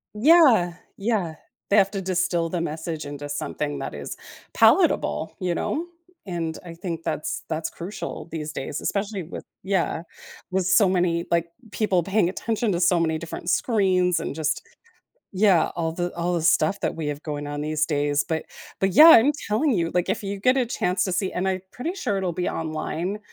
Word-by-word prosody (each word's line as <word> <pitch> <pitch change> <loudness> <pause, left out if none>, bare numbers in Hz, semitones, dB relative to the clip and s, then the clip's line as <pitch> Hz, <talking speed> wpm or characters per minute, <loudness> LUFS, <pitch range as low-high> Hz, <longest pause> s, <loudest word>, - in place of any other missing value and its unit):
Yeah, 240 - +5 0.2
yeah, 195 -6 -1 0.3
they 200 - +4
have 195 -1 +5
to 195 -2 -3
distill 180 -2 0
the 175 0 -2
message 160 -1 -4
into 145 0 -6
something 145 0 -3
that 135 - -5
is 70 -1 -6 0.4
palatable, 75 0 +3
you 180 -2 -1
know, 330 - -2 0.4
and 165 -4 -3
I 170 -2 -9
think 170 -1 -5
that's 150 - -3
that's 160 0 -2
crucial 180 +2 -6
these 155 -1 -5
days, 140 +1 -4
especially 200 -1 -2
with 160 - -8 0.2
Yeah, 185 -4 0 0.5
with 185 -1 0
so 200 +1 +5
many, 175 -2 +1
like 170 0 +2 0.2
people 195 -6 +1
paying 195 0 +2
attention 225 +3 -1
to 170 - -1
so 175 0 +3
many 160 -1 +1
different 170 +1 -6
screens 185 -5 +2
and - - -4
just 155 0 -1 0.7
yeah, 190 -3 +4
all 165 -1 -1
the 175 +1 -3
all 175 +1 -1
the 170 - -1
stuff 200 +4 +2
that - - -1
we 160 -2 -4
have 145 0 -4
going 145 -2 -4
on 145 0 -4
these 155 +1 0
days. 145 -1 +1
But 160 -2 -1 0.4
but 195 0 +2
yeah, 310 - +10
I'm 280 0 +7 0.2
telling 250 +9 +2
you, 170 -6 0
like, 180 -1 +1
if - - -1
you 200 0 -4
get 255 +6 +3
a 250 - +1
chance 180 -5 0
to 185 - -2
see- 185 +2 -1
and 185 +2 -1
I'm 185 -1 -1
pretty 325 +9 -4
sure 210 - -1
it'll 185 -2 -1
be 180 - -1
online 165 +4 -3
175 Hz, 190 wpm, -24 LUFS, 160-195 Hz, 0.7 s, yeah